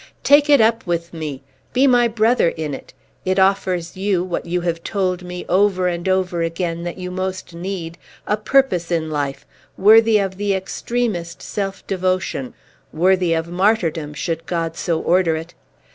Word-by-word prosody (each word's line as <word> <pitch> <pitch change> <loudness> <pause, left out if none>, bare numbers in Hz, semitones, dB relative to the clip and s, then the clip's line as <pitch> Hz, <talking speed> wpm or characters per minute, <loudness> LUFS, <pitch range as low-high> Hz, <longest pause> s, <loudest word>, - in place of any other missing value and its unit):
Take 290 +1 +5
it 285 -2 +7
up 225 +1 +3
with 170 0 -2
me! 150 -5 -6 0.3
Be 260 +2 +4
my 245 -3 +5
brother 225 -3 +2
in 155 -3 -4
it! - - -9 0.3
It 185 0 0
offers 190 -3 +1
you 190 -2 0
(what 180 -1 -4
you 175 +1 -1
have 170 -1 -2
told 185 -3 -1
me, 180 0 -7
over 185 0 +2
and 175 +1 -2
over 185 -2 0
again, 165 0 -2
that 175 - -5
you 180 -1 -5
most 185 -1 -4
need) 170 -1 -5 0.3
a 210 - +1
purpose 215 -6 +1
in 160 -2 -1
life, 145 -2 -3 0.3
worthy 220 +2 +6
of 195 -2 -2
the 200 -1 0
extremest 190 -3 -3
self 195 -1 -4
devotion, 185 -8 -2 0.4
worthy 180 +1 +2
of 165 +1 -2
martyrdom, 175 -5 0
should 165 +1 -3
God 165 -2 -2
so 165 -1 -1
order 175 -2 +2
it! 165 +2 -7
180 Hz, 165 wpm, -20 LUFS, 170-200 Hz, 0.4 s, it